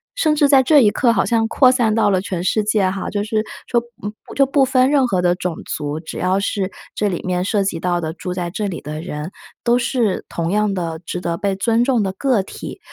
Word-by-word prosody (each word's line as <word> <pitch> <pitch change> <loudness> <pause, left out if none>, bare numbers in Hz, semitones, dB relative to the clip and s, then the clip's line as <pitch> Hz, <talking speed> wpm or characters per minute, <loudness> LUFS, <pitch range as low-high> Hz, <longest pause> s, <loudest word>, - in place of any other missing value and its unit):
甚 310 -11 +2
至 290 -1 +4
在 275 -2 +6
这 290 +3 +5
一 210 -2 +5
刻 240 -3 +2
好 200 - +1
像 225 -2 +1
扩 255 +2 +5
散 230 -4 +1
到 220 -2 +3
了 185 -1 +2
全 180 -3 -4
世 215 +3 +1
界 210 -2 +2
哈， 190 0 -4
就 205 -1 -2
是 215 0 -1 0.2
说 235 -1 +2 0.2
嗯， 205 +1 -4
不 - - -11
就 275 - +4
不 275 +1 +2
分 260 +1 +3
任 270 -4 +3
何 185 -5 0
的 175 0 +4
种 180 -3 -3
族， 150 +1 -4
只 160 - -7
要 185 +2 +1
是 195 -1 -2 0.2
这 210 -1 0
里 175 - -3
面 180 0 -1
涉 200 +1 +1
及 185 -4 -2
到 175 0 0
的 160 -1 -4
住 180 +1 -6
在 175 -1 -3
这 205 +3 -2
里 180 - -4
的 155 +1 -6
人， 155 0 -6 0.3
都 240 +1 +3
是 235 -5 0
同 170 0 -2
样 210 0 +1
的 165 -3 -3
值 175 +1 -5
得 170 -1 -2
被 200 -1 -1
尊 230 +4 +2
重 245 -4 +2
的 190 -1 -2
个 230 -1 +1
体。 - - -9
200 Hz, 270 characters per minute, -19 LUFS, 180-235 Hz, 0.3 s, 在